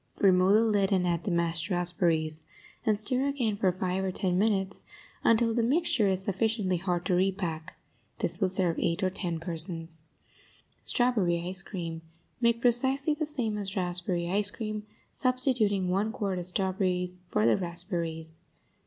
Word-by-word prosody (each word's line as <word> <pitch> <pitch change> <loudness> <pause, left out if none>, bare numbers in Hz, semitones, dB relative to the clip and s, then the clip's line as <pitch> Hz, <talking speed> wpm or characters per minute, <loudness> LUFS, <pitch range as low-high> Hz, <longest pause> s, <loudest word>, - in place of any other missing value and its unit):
Remove 185 0 +4
the 225 - +3
lid 205 -2 +1
and 185 -2 +2
add 170 +1 -1
the - - -1
mashed 170 0 -1
raspberries, 170 -3 +2 0.5
and 215 -1 +3
stir 255 +6 +3
again 250 -7 -1
for 190 -2 +1
five 185 +1 -2
or 190 - -1
ten 180 -1 -1
minutes 195 -1 0 0.4
until 230 0 +3
the 235 - +1
mixture 255 -3 +2
is 190 -1 0
sufficiently 200 -1 0
hard 175 -1 -2
to - - 0
repack. 180 -4 -2 0.4
This - - -3
will 190 -3 +1
serve 180 -2 0
eight 170 +3 -1
or 185 - +1
ten 175 -3 -3
persons. 165 -1 -5 0.8
STRAWBERRY 185 -9 +1
ICE 190 +1 +6
CREAM 170 -5 -6 0.4
Make 235 0 +2
precisely 265 +5 +2
the 300 0 -3
same 235 -8 -1
as 195 -1 -4
raspberry 175 -1 -1
ice 200 +3 +5
cream, 215 -1 -5 0.2
substituting 250 -7 +1
one 195 +4 0
quart 200 -6 -3
of 175 - +2
strawberries 185 -1 0
for 105 - +1
the 115 - +4
raspberries. 170 -3 -4
190 Hz, 160 wpm, -28 LUFS, 175-215 Hz, 0.8 s, ICE